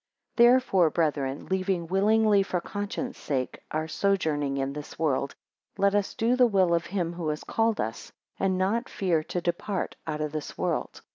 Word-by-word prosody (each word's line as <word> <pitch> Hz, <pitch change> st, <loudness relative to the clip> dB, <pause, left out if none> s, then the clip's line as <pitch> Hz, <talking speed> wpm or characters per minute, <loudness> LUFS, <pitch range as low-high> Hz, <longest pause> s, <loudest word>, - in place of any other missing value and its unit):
THEREFORE 240 Hz, -8 st, +5 dB
brethren, 145 Hz, -4 st, -1 dB
leaving 185 Hz, -2 st, -1 dB
willingly 205 Hz, +3 st, +3 dB
for 185 Hz, -2 st, -1 dB
conscience 205 Hz, +7 st, -5 dB
sake 130 Hz, -3 st, -2 dB
our 155 Hz, +1 st, -2 dB
sojourning 155 Hz, -7 st, 0 dB
in 135 Hz, 0 st, -1 dB
this 150 Hz, 0 st, -8 dB
world, 140 Hz, -3 st, 0 dB, 0.4 s
let 200 Hz, 0 st, +3 dB
us 205 Hz, -1 st, 0 dB
do 235 Hz, +3 st, +2 dB
the 250 Hz, -1 st, +5 dB
will 190 Hz, -5 st, +3 dB
of 170 Hz, 0 st, 0 dB
him 175 Hz, -3 st, -2 dB
who 170 Hz, -2 st, -4 dB
has 150 Hz, 0 st, -3 dB
called 225 Hz, -1 st, 0 dB
us, 110 Hz, +1 st, -4 dB, 0.3 s
and 190 Hz, -1 st, +1 dB
not 215 Hz, +7 st, 0 dB
fear 175 Hz, -5 st, +1 dB
to 180 Hz, -, -3 dB
depart 175 Hz, +3 st, -2 dB
out 155 Hz, -1 st, -2 dB
of 150 Hz, -1 st, -2 dB
this 155 Hz, -1 st, -5 dB
world. -, -, -2 dB
180 Hz, 170 wpm, -27 LUFS, 155-205 Hz, 0.4 s, THEREFORE